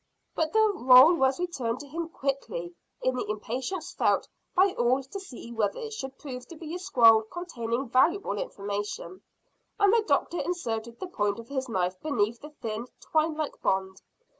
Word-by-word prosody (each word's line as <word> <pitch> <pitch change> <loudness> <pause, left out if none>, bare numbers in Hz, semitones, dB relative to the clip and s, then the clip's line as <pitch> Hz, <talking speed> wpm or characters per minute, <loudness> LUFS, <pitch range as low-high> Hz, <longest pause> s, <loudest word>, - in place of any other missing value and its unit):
But 320 -1 0
the 440 -1 +4
roll 255 +6 +8
was 265 -3 +2
returned 255 -10 -2
to 290 - -10
him 330 +3 -4
quickly 230 - -3 0.3
in 255 0 +2
the 250 - -3
impatience 250 - -4
felt - - +2 0.3
by 375 +1 +5
all 250 +3 +2
to 270 +10 -7
see 250 -10 -10
whether 215 -4 0
it 445 -1 -6
should 265 -9 -6
prove 250 -4 -8
to 335 - -10
be 320 0 -7
a 360 - -3
scroll 230 -10 +6
containing 240 -2 -4
valuable 310 - +2
information, 200 - -5 0.6
and 405 0 +5
the 460 - +5
doctor 345 - +1
inserted 235 -10 -3
the - - -4
point 205 - -1
of 230 0 -10
his 265 -2 -3
knife 185 -3 -1
beneath 230 -6 0
the 300 - -9
thin 230 -5 -5
twine 315 0 +1
like 310 -1 -4
bond. 190 0 0
260 Hz, 175 wpm, -28 LUFS, 225-330 Hz, 0.6 s, roll